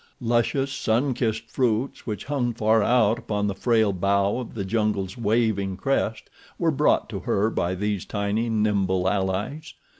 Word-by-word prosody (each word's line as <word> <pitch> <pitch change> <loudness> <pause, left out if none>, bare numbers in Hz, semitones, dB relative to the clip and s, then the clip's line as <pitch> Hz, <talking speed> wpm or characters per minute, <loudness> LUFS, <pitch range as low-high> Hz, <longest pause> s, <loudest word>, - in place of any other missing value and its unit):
Luscious, 120 +3 0
sun 125 +4 +1
kissed 115 -1 -2
fruits 125 +1 -1
which 105 -3 -4
hung 125 -5 -1
far 110 0 +3
out 115 0 +3
upon 105 -1 -2
the 100 - 0
frail 110 0 +2
bough 100 +4 +1
of 125 - -7
the 100 -3 -3
jungle's 100 -2 -1
waving 110 -4 0
crest 115 -1 -1 0.3
were - - +2
brought - - +2
to - - -4
her 105 +3 0
by 90 +2 -1
these 105 0 -2
tiny, 105 +3 -1
nimble 100 -4 +1
allies. 100 - -2
110 Hz, 155 wpm, -24 LUFS, 100-120 Hz, 0.3 s, far